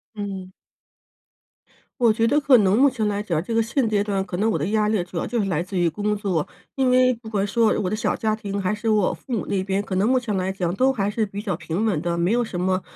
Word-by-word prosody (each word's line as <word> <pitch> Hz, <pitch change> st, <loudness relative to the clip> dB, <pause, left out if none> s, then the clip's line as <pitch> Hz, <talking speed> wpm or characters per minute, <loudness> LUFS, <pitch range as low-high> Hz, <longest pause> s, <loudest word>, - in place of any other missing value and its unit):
嗯。 195 Hz, -3 st, -6 dB, 1.5 s
我 230 Hz, -2 st, +5 dB
觉 225 Hz, +1 st, +1 dB
得 285 Hz, +6 st, +3 dB
可 275 Hz, -3 st, +5 dB
能 200 Hz, 0 st, +3 dB
目 280 Hz, +1 st, +6 dB
前 235 Hz, -4 st, -2 dB
来 205 Hz, 0 st, -2 dB
讲， 170 Hz, -6 st, -1 dB
这 230 Hz, -, -4 dB
个 230 Hz, -, +3 dB
现 235 Hz, +2 st, 0 dB
阶 210 Hz, -2 st, +1 dB
段 200 Hz, -2 st, -1 dB
可 190 Hz, -2 st, -5 dB
能 215 Hz, +4 st, +1 dB
我 -, -, +1 dB
的 -, -, -2 dB
压 210 Hz, 0 st, +1 dB
力 210 Hz, -4 st, +1 dB
主 175 Hz, 0 st, -8 dB
要 -, -, -2 dB
就 240 Hz, -, -2 dB
是 200 Hz, -2 st, 0 dB
来 165 Hz, -3 st, 0 dB
自 185 Hz, +2 st, -5 dB
于 175 Hz, -1 st, +3 dB
工 210 Hz, +5 st, -1 dB
作。 190 Hz, -7 st, -1 dB, 0.3 s
因 265 Hz, -2 st, +2 dB
为 255 Hz, 0 st, +4 dB
不 225 Hz, -1 st, -11 dB
管 200 Hz, -2 st, 0 dB
说 225 Hz, +1 st, +2 dB
我 185 Hz, -, -1 dB
的 215 Hz, -, -1 dB
小 215 Hz, -, -1 dB
家 220 Hz, -1 st, 0 dB
庭 200 Hz, -2 st, -4 dB
还 190 Hz, +2 st, 0 dB
是 215 Hz, +2 st, -5 dB
我 215 Hz, -3 st, +2 dB
父 260 Hz, -, -8 dB
母 225 Hz, -, -1 dB
那 195 Hz, -, 0 dB
边， 195 Hz, +1 st, -1 dB
可 195 Hz, -, -4 dB
能 195 Hz, +3 st, +2 dB
目 260 Hz, +1 st, +3 dB
前 235 Hz, -5 st, -2 dB
来 185 Hz, 0 st, -1 dB
讲 180 Hz, -3 st, -2 dB
都 260 Hz, +5 st, +3 dB
还 200 Hz, -5 st, -1 dB
是 220 Hz, +1 st, 0 dB
比 200 Hz, 0 st, -6 dB
较 195 Hz, -6 st, -3 dB
平 170 Hz, +6 st, -3 dB
稳 190 Hz, -9 st, 0 dB
的， 170 Hz, 0 st, -2 dB
没 170 Hz, +3 st, +1 dB
有 240 Hz, +1 st, +2 dB
什 215 Hz, -6 st, -4 dB
么， 185 Hz, 0 st, +1 dB
205 Hz, 300 characters per minute, -23 LUFS, 190-225 Hz, 1.5 s, 目